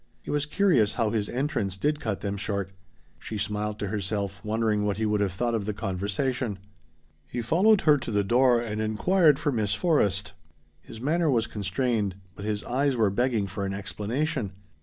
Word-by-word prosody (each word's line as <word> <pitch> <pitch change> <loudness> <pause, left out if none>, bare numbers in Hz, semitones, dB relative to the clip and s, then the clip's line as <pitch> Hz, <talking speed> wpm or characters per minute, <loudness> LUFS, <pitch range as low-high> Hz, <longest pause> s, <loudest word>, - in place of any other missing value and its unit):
It - - -4
was 145 0 0
curious 150 - +3
how 115 -3 +1
his 105 -3 -1
entrance 120 -8 -1
did 150 +7 0
cut 110 -7 -3
them 100 -1 -2
short. 100 -1 -3 0.5
She 110 - -5
smiled 105 +1 -2
to 105 - -3
herself, 100 -1 -2
wondering 110 -1 +1
what 105 -1 0
he 110 - 0
would 105 -1 +1
have 100 -2 +1
thought 120 +6 -1
of 110 -3 -1
the 105 - -2
conversation. 105 +3 -1 0.7
He 120 - -4
followed 185 - +4
her 150 -2 +5
to 120 - -6
the 105 -2 +1
door 120 +3 +4
and 110 -2 -3
inquired 150 - +3
for 145 -1 0
Miss 105 -5 0
Forrest. 105 - +1 0.5
His 110 - -11
manner 160 +6 +1
was 120 -4 +2
constrained, 105 -1 -1 0.2
but 100 - -7
his 105 -1 -2
eyes 135 +2 +1
were 110 -4 +2
begging 120 -1 +1
for 100 +1 -5
an 95 0 -2
explanation. 110 +3 -2
110 Hz, 185 wpm, -27 LUFS, 100-130 Hz, 0.7 s, her